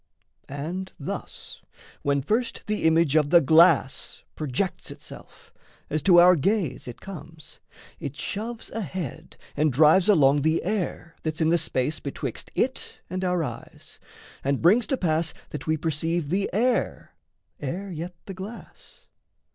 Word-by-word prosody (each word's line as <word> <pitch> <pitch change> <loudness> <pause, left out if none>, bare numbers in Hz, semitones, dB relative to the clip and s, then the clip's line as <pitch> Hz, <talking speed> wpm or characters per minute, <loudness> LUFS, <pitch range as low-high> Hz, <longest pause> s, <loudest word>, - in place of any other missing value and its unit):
And 170 +7 -5
thus, 140 - -6 0.4
when 140 -1 +1
first 230 - -1
The 210 -4 -1
image 160 -2 +4
of 150 -2 +4
the 175 +2 +7
glass 160 -2 +4
projects 155 +6 -2
itself, - - -12 0.4
As 155 +1 0
to 175 +2 +6
our 180 +1 +8
gaze 185 -2 0
it 120 - -8
comes, 165 -5 -10 0.4
it 140 0 -5
shoves 220 +9 -4
ahead 170 - -5 0.2
And 150 0 +2
drives 155 - +5
along 145 -7 +5
the 160 +3 +1
air 180 -4 -3
that's 155 -1 -3
in 160 -1 +3
the 170 - +4
space 140 +3 -1
Betwixt 140 - -5
it - - -1
and 185 +1 -2
our 180 -2 +1
eyes, - - -8 0.4
and 140 0 +1
brings 210 +8 +4
to 270 - 0
pass 160 -3 0 0.2
That 150 - -6
we 155 0 +2
perceive 160 0 -1
the 195 +4 0
air 235 +5 0 0.5
ere 185 +8 -4
yet 175 +2 -6
the 195 - -6
glass. 195 +5 -11
165 Hz, 145 wpm, -25 LUFS, 150-190 Hz, 0.5 s, our